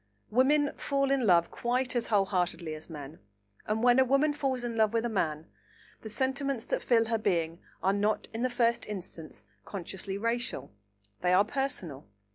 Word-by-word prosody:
Women 280 +5 +3
fall 275 -1 0
in 265 -5 +2
love 170 -2 +4
quite 250 +2 -1
as 240 - 0
whole 205 -3 +3
heartedly 175 -4 -1
as 155 +2 -10
men, 150 -1 -8 0.5
and 220 +2 0
when 245 +1 +6
a - - +7
woman 275 +4 +3
falls 265 -4 -1
in 235 -1 -3
love 220 -1 +3
with 230 0 +1
a - - 0
man, 160 -7 -1 0.6
the 220 - -7
sentiments 265 +1 -1
that - - -1
fill 230 -2 +3
her 225 0 0
being 170 -4 0 0.2
are 190 - +3
not 205 +1 0
in 225 - -3
the 255 - +1
first 235 -1 +1
instance 170 - -7 0.2
consciously 190 0 -5
racial; 230 - -2 0.5
they 180 0 +2
are 195 +3 +5
personal. 210 - -4
220 Hz, 180 wpm, -30 LUFS, 180-255 Hz, 0.6 s, a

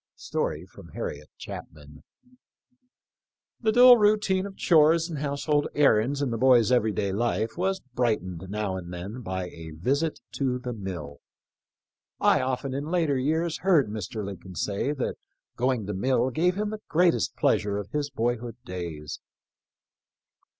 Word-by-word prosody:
* - - -61
The - - -5 2.4
dull 245 +2 +9
routine 205 -3 +2
of 195 - -12
chores 165 0 +4
and 160 -5 -5
household 145 +1 0
errands 140 0 +3
in 130 - -1
the 115 - -2
boy's 125 -3 +5
every 115 -3 +3
day 100 -1 -1
life 110 +1 -1
was 190 +2 -1
brightened 95 -8 -1
now 105 -2 -2
and 90 -1 -8
then 95 +8 -6
by 95 -4 -4
a 80 -1 -10
visit 140 - 0 0.2
to 130 -3 0
the 125 -1 -5
mill. 90 -9 -6 1.0
I - - +4
often 130 +1 -2
in 140 +2 -3
later 165 -5 +1
years 160 +5 0
heard 170 - +3
Mr. 105 0 -5
Lincoln 95 -1 -8
say 100 - -1
that 140 -4 -3 0.4
going 125 -3 0
to 105 - -3
mill 125 +5 +1
gave 175 +7 +1
him 210 +1 -2
the 215 -1 -6
greatest 175 +1 +2
pleasure 100 -1 +1
of 100 -1 -6
his 145 -1 -1
boyhood 120 -2 -2
days. 85 - -6
125 Hz, 140 wpm, -26 LUFS, 100-160 Hz, 2.4 s, dull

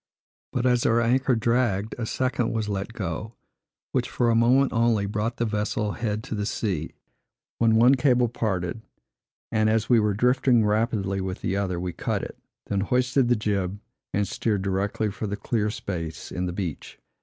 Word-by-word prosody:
But 125 0 -1
as 125 -1 +3
our 115 +1 +3
anchor 130 +2 +2
dragged, 115 -3 +1
a 115 - -2
second 130 -1 0
was 110 -2 -1
let 100 +1 -3
go, 110 +2 -4 0.6
which, - - 0
for 120 -1 +1
a - - +3
moment 125 +4 +4
only, 115 -3 +2
brought 105 +3 -2
the 120 - 0
vessel 105 0 -1
head 110 -1 -3
to - - -6
the 105 -1 -2
sea, 90 -9 -2 0.6
when 115 -1 +4
one 120 +4 +6
cable 125 -2 +3
parted; 105 -4 -2 0.7
and 110 -1 +2
as 110 0 +1
we 120 -2 +6
were 105 -2 +1
drifting 125 0 +3
rapidly 105 -3 0
with 95 0 -4
the 95 - -1
other, 95 -3 -1
we 90 0 -3
cut - - -2
it, - - -8 0.3
then 100 - -1
hoisted 125 +4 +2
the 120 - +4
jib, 100 -3 -1 0.3
and 100 0 0
steered 105 -2 -1
directly 100 +2 -1
for 110 +1 -4
the 100 +1 -3
clear 105 0 -1
space 85 -6 -5
in 90 0 -2
the 90 - -3
beach. 90 -5 -5
110 Hz, 180 wpm, -25 LUFS, 100-120 Hz, 0.7 s, one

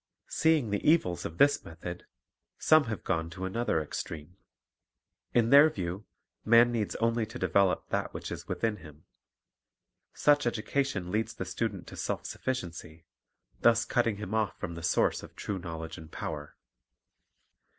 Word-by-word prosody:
Seeing 155 -9 +2
the 100 - 0
evils 150 - +2
of 80 - -6
this 145 0 +4
method, 85 +2 -8 0.5
some 155 -2 +5
have 110 -2 -4
gone 80 0 -1
to 95 +2 -6
another 105 -2 0
extreme. 75 +2 -6 1.0
In 120 0 +2
their 145 +3 +9
view, 95 - -5 0.4
man 115 +2 +6
needs 110 -4 -1
only 115 0 +1
to 110 - -8
develop 100 -2 +2
that - - -1
which - - -6
is - - -6
within 110 -2 -1
him. 75 -3 -14 1.1
Such 145 -3 +3
education 115 -4 -1
leads 110 +2 -1
the - - -4
student - - -3
to - - -10
self - - -3
sufficiency, 85 -9 -5 0.5
thus 115 -1 +4
cutting 120 -4 +1
him 105 0 -6
off 110 -2 0
from 85 - -4
the 85 - -7
source 85 0 +2
of - - -12
true 100 -2 -4
knowledge 80 -1 -6
and 80 0 -12
power. 75 -2 -6
105 Hz, 150 wpm, -30 LUFS, 85-120 Hz, 1.1 s, their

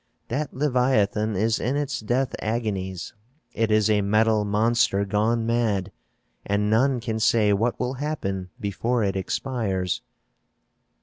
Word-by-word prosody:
"That 140 +3 -2
leviathan 125 -6 +1
is 110 +3 +1
in 125 +4 -1
its 145 -1 -2
death 120 +3 -1
agonies; 100 -6 -3 0.4
it 115 -1 0
is 110 -1 +3
a 105 -1 +3
metal 105 +1 +2
monster 105 -1 +2
gone 110 +3 +1
mad, 110 -5 0 0.5
and 105 +1 0
none 130 +3 +3
can 115 -1 -3
say 110 -1 +3
what 115 +4 0
will 125 +1 -1
happen 110 -10 -3
before 110 +4 -1
it 95 -1 0
expires." 95 -2 -2
110 Hz, 130 wpm, -24 LUFS, 100-120 Hz, 0.5 s, is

